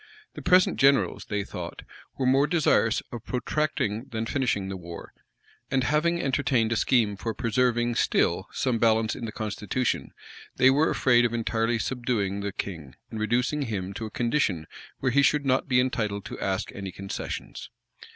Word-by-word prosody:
The - - -8
present 180 0 +4
generals, 135 0 +3
they 105 -1 -2
thought, - - -7 0.3
were 130 - -1
more 135 +3 +4
desirous 150 -8 +2
of 120 -2 -7
protracting 125 -4 -1
than 110 0 -3
finishing 115 -7 0
the 95 - -4
war; 85 -2 -9 0.6
and 130 -1 +1
having 160 +5 +1
entertained 130 -5 +1
a - - +2
scheme 110 -2 +2
for 110 +2 -4
preserving 120 0 +1
still 95 -4 +1
some 125 -4 0
balance 110 -1 +2
in 120 - -5
the 110 - -5
constitution, 110 +3 -2 0.4
they 125 +1 +6
were 150 +4 +3
afraid 120 -2 +4
of 120 -1 +1
entirely 115 +1 0
subduing 115 -5 -1
the 100 0 -3
king, 80 -9 -6 0.2
and 110 - -5
reducing 125 +7 0
him 100 -7 -3
to 110 +3 -5
a - - -8
condition 115 - 0 0.4
where 130 - +1
he 140 +3 +4
should 145 0 +2
not 130 0 +1
be 125 -2 +3
entitled 110 -5 -1
to - - -7
ask 95 +1 -2
any 95 -2 -6
concessions. 95 +2 -6
115 Hz, 170 wpm, -26 LUFS, 105-130 Hz, 0.6 s, they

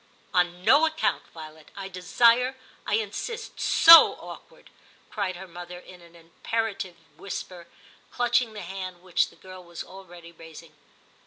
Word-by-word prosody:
* - - -34
On 180 0 0
no 305 +8 +5
account. 315 0 -2
Violet! 155 -1 -12
I 195 -1 -7
desire, 235 +8 +2 0.3
I 205 - +1
insist; 225 - -5
so 330 0 +8
awkward! - - -13 0.2
' - - -32
cried 195 -4 -3
her 190 +2 -10
mother 175 0 -10
in 180 0 -15
an 170 0 -19
impera 210 +7 -4
tive 190 -3 -8 0.2
whisper, 180 -1 -8 0.4
clutching 240 -1 0
the 210 - -8
hand 185 -1 -8
which 180 -2 0
the - - -20
girl 185 -1 -13
was 170 -1 -9
already 175 -3 -14
raising. 165 -1 -14
185 Hz, 155 wpm, -25 LUFS, 175-220 Hz, 0.4 s, so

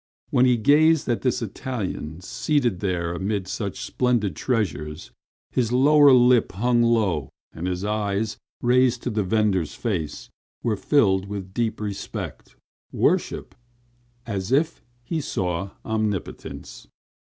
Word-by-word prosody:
When 125 +1 +4
he 125 -1 +4
gazed 150 +6 +4
at 120 - 0
this 125 -2 0
Italian 95 -8 -5
seated 120 - 0
amid 95 +2 -1
such 100 -1 -4
splendid 120 -8 0
treasures, 75 - -2 0.4
his 120 -3 0
lower 145 +3 +6
lip 125 -2 +5
hung 120 +4 +2
low 105 - +1 0.2
and 85 +3 -4
his 90 +2 -2
eyes, 105 0 -1 0.2
raised 125 0 +3
to 125 - -2
the 105 0 0
vendor's 95 -4 +1
face, 85 -10 -3 0.3
were 115 -2 +1
filled 100 -6 +2
with 100 -2 -6
deep 115 0 -1
respect, 105 -2 -6 0.4
worship, - - 0 0.7
as 100 -2 -3
if 155 +5 +1 0.2
he 160 +6 -2
saw 95 -6 -2 0.2
omnipotence. 110 - -4
110 Hz, 120 wpm, -24 LUFS, 95-125 Hz, 0.7 s, lower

